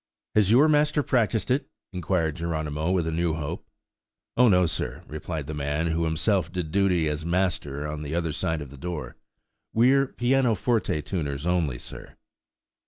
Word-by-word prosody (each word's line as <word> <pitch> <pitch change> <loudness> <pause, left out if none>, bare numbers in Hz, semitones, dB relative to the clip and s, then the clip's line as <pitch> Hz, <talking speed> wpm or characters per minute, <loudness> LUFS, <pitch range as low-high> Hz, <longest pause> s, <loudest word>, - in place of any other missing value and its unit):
"Has 105 -3 +4
your 130 +8 +6
master 150 0 +3
practised 115 -4 +1
it?" 135 +2 0 0.2
inquired 85 -3 0
Geronimo, 80 -1 -2
with 90 -3 +1
a 80 - -1
new 85 0 0
hope. 75 -2 -5 0.7
"Oh, 125 0 +6
no, 90 -2 +5
sir," 80 - -2
replied 75 0 -5
the 75 - -5
man, 75 +2 -1
who 85 +1 0
himself 85 +2 +1
did 85 -4 -3
duty 90 -4 +2
as 75 +1 -2
master 80 -5 -1
on 75 0 -5
the 75 +1 -4
other 85 -2 -1
side 80 0 -1
of 70 - -12
the 70 - -11
door; 75 -6 -5 0.6
"we're 135 +4 +4
pianoforte 120 - +1
tuners 75 -4 -3
only, 85 -8 +1
sir." - - -9
85 Hz, 165 wpm, -26 LUFS, 75-105 Hz, 0.7 s, your